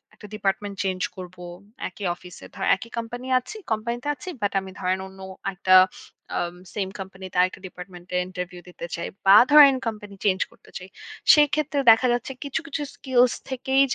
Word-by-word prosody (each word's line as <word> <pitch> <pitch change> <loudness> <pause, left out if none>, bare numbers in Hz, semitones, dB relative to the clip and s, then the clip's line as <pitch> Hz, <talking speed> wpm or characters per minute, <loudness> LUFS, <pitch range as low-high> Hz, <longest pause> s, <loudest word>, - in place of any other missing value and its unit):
একটা 210 - -12
department 200 0 -2
change 185 -1 -2
করব 180 -1 -9 0.5
একই 195 +1 -8
অফিসে 180 0 -13
ধরেন 190 - -2
একই 230 +4 -10
কোম্পানি 245 +2 -5
আছি 255 - -10
কোম্পানি 235 +2 -1
তে - - -6
আছি। 370 - -9
বাট 205 - +1
আমি 190 0 -9
ধরেন 185 +1 0
অন্য 190 0 -15 0.3
একটা 185 0 +2 0.6
আ - - 0 0.4
সেম 195 -3 -2
কোম্পানি 190 0 -8
তে - - -4
আরেকটা 185 +1 0
ডিপার্টমেন্ট 180 0 -11
এ - - +3
ইন্টারভিউ 180 -1 -6
দিতে 175 - -8
চাই, 170 - -4 0.2
বা 195 +1 +8 0.2
ধরেন 290 -3 +9
কোম্পানি 210 -2 -6
চেঞ্জ 190 -2 +3
করতে - - -21
চাই। 185 0 -11 0.4
সেক্ষেত্রে 295 -1 +3
দেখা 250 +3 +4
যাচ্ছে 245 +2 -3
কিছু 280 +2 -2
কিছু 295 0 -4
স্কিলস 250 -2 +3 0.2
থেকেই 265 +1 +1
200 Hz, 175 wpm, -24 LUFS, 185-250 Hz, 0.6 s, ধরেন